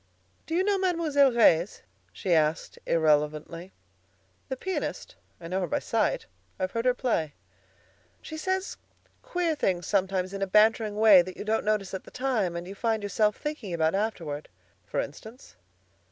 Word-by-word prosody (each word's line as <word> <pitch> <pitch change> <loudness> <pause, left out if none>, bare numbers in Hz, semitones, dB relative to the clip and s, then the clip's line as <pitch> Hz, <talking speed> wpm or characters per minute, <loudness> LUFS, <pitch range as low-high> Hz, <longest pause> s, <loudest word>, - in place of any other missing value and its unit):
"Do 325 - -2
you 365 - +3
know 400 0 +1
Mademoiselle 325 -7 +3
Reisz?" 200 -6 +3 0.3
she 175 - -1
asked 155 0 +1
irrelevantly. 155 +2 +1 0.8
"The 265 - -3
pianist? 380 +7 -4 0.3
I 165 - -8
know 185 +2 -1
her 180 - -1
by - - 0
sight. - - 0 0.3
I've 185 0 -1
heard 230 +1 -2
her 250 -1 +3
play." 165 - -1 0.8
"She 315 - -9
says 375 +5 -2 0.4
queer 350 -2 -1
things 180 - -1
sometimes 190 -1 0
in 195 - -5
a 195 - 0
bantering 215 +1 +3
way 210 -3 +7
that 185 +1 -8
you - - -5
don't 220 +1 0
notice 210 -3 -1
at 190 - -4
the - - -13
time 235 -9 -1
and 170 +1 -5
you 195 - -7
find 220 0 -1
yourself 210 +1 +1
thinking 275 - -4
about 160 -1 +1
afterward." 175 -8 -3 0.4
"For - - -2
instance?" 220 - -8
205 Hz, 165 wpm, -27 LUFS, 175-255 Hz, 0.8 s, way